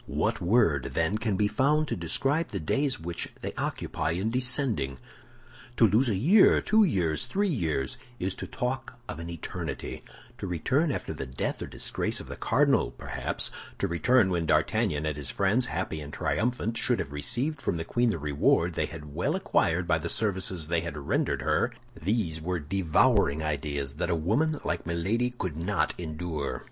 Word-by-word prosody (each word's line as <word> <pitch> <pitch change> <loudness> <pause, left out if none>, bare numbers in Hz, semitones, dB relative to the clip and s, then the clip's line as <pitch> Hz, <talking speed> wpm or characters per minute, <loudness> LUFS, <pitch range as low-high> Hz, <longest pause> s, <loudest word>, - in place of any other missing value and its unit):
What - - 0
word, 85 - +2
then, 85 +6 +1
can 110 -3 0
be 105 - +3
found 150 +6 +2
to - - 0
describe 135 - 0
the - - -4
days 135 - 0
which 85 0 -4
they - - -4
occupy 80 - -2
in 95 +6 -1
descending? 125 - +1 0.8
To 115 - +7
lose 115 +6 +3
a 105 - +1
year, 175 - +6
two 220 0 +4
years, 90 - +1
three 205 +1 +1
years, 85 - -1 0.2
is 95 -2 -1
to - - -5
talk 130 0 -3
of 80 - -6
an 85 +1 -6
eternity; 85 -1 -5 0.4
to - - -4
return 130 - +1
after - - -3
the 65 - -5
death 65 +1 -3
or - - -4
disgrace - - 0
of - - -8
the - - -5
cardinal, - - +2
perhaps; - - -3 0.3
to 100 - 0
return 95 +5 +3
when 85 -2 0
D'Artagnan 80 0 +2
and 75 -2 -1
his 70 -1 -2
friends, 110 +6 +2
happy 80 -1 -3
and 75 0 -8
triumphant, 115 - -1
should - - +2
have 70 - -4
received 125 - 0
from 85 - -1
the 80 - -4
queen 120 +5 +2
the 105 - 0
reward 75 -1 +2
they - - -1
had 75 -3 -9
well 115 - 0
acquired 90 - +1
by 80 -2 +3
the 85 +2 -4
services 95 -6 0
they 85 0 +1
had 85 -3 -5
rendered 70 - 0
her—these 85 -3 -1
were 90 +2 -1
devouring 80 -2 +2
ideas 70 -2 -2
that 90 - -1
a - - +2
woman 125 - +1
like 85 -1 -2
Milady 95 +9 0
could 95 -11 -5
not 90 -5 +1
endure. 80 -3 -3
90 Hz, 180 wpm, -28 LUFS, 80-125 Hz, 0.8 s, To